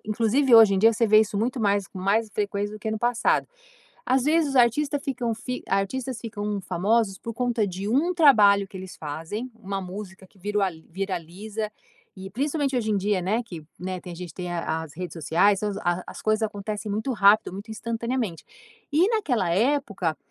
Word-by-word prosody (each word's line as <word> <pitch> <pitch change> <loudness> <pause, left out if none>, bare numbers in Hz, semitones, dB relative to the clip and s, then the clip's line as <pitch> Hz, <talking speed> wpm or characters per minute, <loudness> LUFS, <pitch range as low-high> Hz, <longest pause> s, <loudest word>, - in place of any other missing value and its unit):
Inclusive, 230 +5 +3
hoje 225 -3 +8
em - - +1
dia 225 +4 +6
você 230 +1 +1
vê 215 0 +6
isso 210 -1 -1
muito 235 +4 -1
mais, 200 -2 +1
com 190 - -11
mais 210 +4 +1
frequência, 205 0 -2
do - - -8
que 220 - -3
no 220 - -2
passado. 240 +1 +1 0.6
Às 260 +1 +3
vezes, 315 +1 +3
os 270 - -2
artistas 280 +4 +3
ficam 245 -4 -2
fi 250 +3 -5
artistas 235 +6 -1
ficam 210 -3 -4
famosos 200 +2 +1
por 230 +4 -7
conta 240 -2 0
de 190 +1 -5
um 300 +10 +2
trabalho 210 - +6
que 195 - -27
eles 185 0 -9
fazem, 165 - -5
uma 195 -3 -5
música 190 0 -8
que 195 - -26
virua 205 0 0 0.2
viraliza 195 +4 -4 0.5
e 190 0 -8
principalmente 280 - -1
hoje 220 -3 0
em 210 - +2
dia, 200 0 +1
né, 210 +7 0
que, 175 -9 -9 0.2
né, 185 0 -4
tem 180 - -9
a - - -12
gente 175 -2 -7
tem 180 +1 -6
a 165 -2 -2
as 160 -3 -10
redes 180 -1 -6
sociais, 175 +5 +2
as 205 -1 -1
a 175 +1 -1
as - - -9
coisas 215 0 +2
acontecem 210 0 -3
muito 215 +6 -1
rápido, 205 -3 +4
muito 200 +4 -8
instantaneamente 230 -4 -3 0.5
e 335 +6 +4
naquela 265 - 0
época, 200 - 0
210 Hz, 195 wpm, -25 LUFS, 190-235 Hz, 0.6 s, hoje